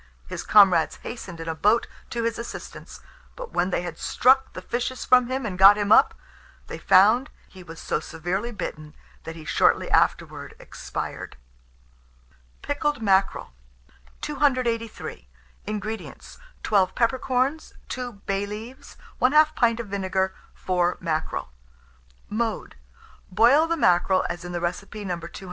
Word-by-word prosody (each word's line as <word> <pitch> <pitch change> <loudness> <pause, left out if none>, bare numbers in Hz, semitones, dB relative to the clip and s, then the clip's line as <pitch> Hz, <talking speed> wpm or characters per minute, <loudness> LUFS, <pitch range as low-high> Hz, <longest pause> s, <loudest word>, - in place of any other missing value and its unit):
His - - -6
comrades 190 -6 +5
hastened 190 -8 -8
in 165 - -7
a 160 - -1
boat 210 +8 +2 0.2
to 235 -1 -3
his 230 0 -2
assistance; 235 - -9 0.3
but - - -8
when 180 +1 +1
they 180 - -1
had 170 -2 -7
struck 265 +2 +3
the 185 - -7
fishes 245 +3 -3
from 250 -1 +5
him 260 0 -3
and 185 -4 -5
got 195 +2 +8
him 205 0 -1
up, - - +6 0.5
they - - -8
found 215 +8 +4 0.2
he 190 - -14
was 165 -2 -11
so - - -2
severely 175 +8 -4
bitten, 155 -8 -7 0.3
that 165 - -7
he 160 -2 -11
shortly - - +2
afterward - - 0
expired. - - -7 1.3
PICKLED 290 0 -1
MACKEREL. 195 - +1 0.7
283. 245 - -2 0.4
INGREDIENTS. 215 +1 -6 0.2
12 195 -3 +2
peppercorns, 260 +4 0
2 250 -1 -4
bay 195 +1 -1
leaves, 225 +5 -9 0.2
1/2 305 +4 +5
pint 235 -4 +2
of 235 - -4
vinegar, 190 -1 -1 0.2
4 180 -1 0
mackerel. 160 - -3 0.8
Mode. 220 0 -3 0.6
Boil 240 - +4
the 335 0 -1
mackerel 185 - +3
as 175 +1 -6
in 175 - -7
the 175 - -3
recipe 195 +4 -4
No. 175 -2 -3
205 Hz, 135 wpm, -24 LUFS, 180-245 Hz, 1.3 s, got